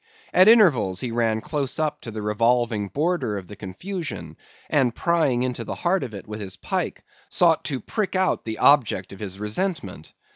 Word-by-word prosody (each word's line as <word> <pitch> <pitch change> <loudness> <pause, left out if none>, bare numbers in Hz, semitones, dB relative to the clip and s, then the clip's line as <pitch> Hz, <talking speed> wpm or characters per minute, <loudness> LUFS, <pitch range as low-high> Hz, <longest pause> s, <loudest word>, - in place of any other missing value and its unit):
At 185 +2 +7
intervals, 145 - +5
he 125 - -3
ran 115 -2 +1
close 140 0 -2
up 155 -1 -1
to - - -7
the 110 -1 -6
revolving 115 0 +1
border 150 - -1
of 95 - -7
the 105 - -10
confusion, 100 - -6 0.3
and 130 -5 +2
prying 160 -8 +1
into 125 -2 -2
the - - -5
heart 185 0 0
of 115 -5 -6
it 100 - -9
with 105 0 -6
his 95 -2 -5
pike, - - -3 0.3
sought 165 -2 +3
to 135 -4 -2
prick 210 - -3
out 185 0 +1
the 110 -1 -4
object 120 -10 +3
of 95 - -12
his 95 -2 -5
resentment. 105 - -3
120 Hz, 185 wpm, -24 LUFS, 105-165 Hz, 0.3 s, At